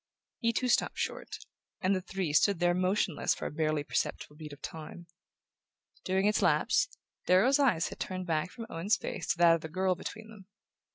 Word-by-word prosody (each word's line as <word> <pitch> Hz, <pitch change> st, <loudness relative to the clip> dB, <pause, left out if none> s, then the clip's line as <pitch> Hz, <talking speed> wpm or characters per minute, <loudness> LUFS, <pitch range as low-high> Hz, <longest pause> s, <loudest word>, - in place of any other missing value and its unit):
He 230 Hz, -1 st, +2 dB
too 250 Hz, +2 st, -1 dB
stopped 245 Hz, -, +1 dB
short, -, -, -4 dB, 0.4 s
and 195 Hz, +1 st, +2 dB
the 185 Hz, -, -2 dB
three 185 Hz, -4 st, -3 dB
stood 200 Hz, +5 st, +4 dB
there 175 Hz, 0 st, +3 dB
motionless 185 Hz, -1 st, +1 dB
for -, -, -6 dB
a -, -, -3 dB
barely 155 Hz, -1 st, 0 dB
perceptible 150 Hz, -, -3 dB
beat 150 Hz, -1 st, -9 dB
of 145 Hz, -, -11 dB
time. 160 Hz, +3 st, -8 dB, 1.0 s
During 190 Hz, +1 st, +1 dB
its 210 Hz, 0 st, +2 dB
lapse, -, -, +3 dB, 0.4 s
Darrow's 235 Hz, +11 st, +5 dB
eyes 235 Hz, -, +2 dB
had -, -, -10 dB
turned 185 Hz, -1 st, -4 dB
back 160 Hz, 0 st, 0 dB
from 230 Hz, +3 st, -8 dB
Owen's 190 Hz, +3 st, 0 dB
face 180 Hz, -, -5 dB
to -, -, +1 dB
that 170 Hz, -1 st, +6 dB
of 165 Hz, -, 0 dB
the 160 Hz, -, -7 dB
girl 185 Hz, +3 st, +1 dB
between 220 Hz, +4 st, -8 dB
them. 205 Hz, -4 st, -14 dB
185 Hz, 190 wpm, -30 LUFS, 165-205 Hz, 1.0 s, that